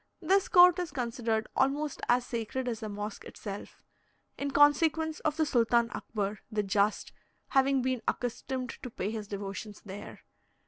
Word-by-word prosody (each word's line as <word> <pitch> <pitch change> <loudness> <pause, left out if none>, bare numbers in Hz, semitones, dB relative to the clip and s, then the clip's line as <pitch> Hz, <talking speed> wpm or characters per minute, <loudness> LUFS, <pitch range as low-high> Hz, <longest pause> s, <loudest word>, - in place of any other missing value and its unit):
This 385 +3 +2
court 360 0 +7
is 355 -2 -2
considered 235 -4 -1
almost 285 +2 0
as 245 0 +3
sacred 245 +3 -3
as 230 -3 -2
the 215 - -5
mosque 205 0 -5
itself, 200 -1 -8 0.5
in 280 - -3
consequence 310 +3 +3
of 310 -1 -1
the 315 - +3
Sultan 235 -3 +2
Akbar, 205 -1 -3
"the 210 -1 0
just," 200 +1 +1 0.4
having 270 -1 +3
been 255 -2 0
accustomed 255 +1 -2
to 250 - -6
pay 205 -2 -3
his 215 -2 -5
devotions 200 +1 -6
there. 200 +1 -9
245 Hz, 150 wpm, -30 LUFS, 215-285 Hz, 0.5 s, court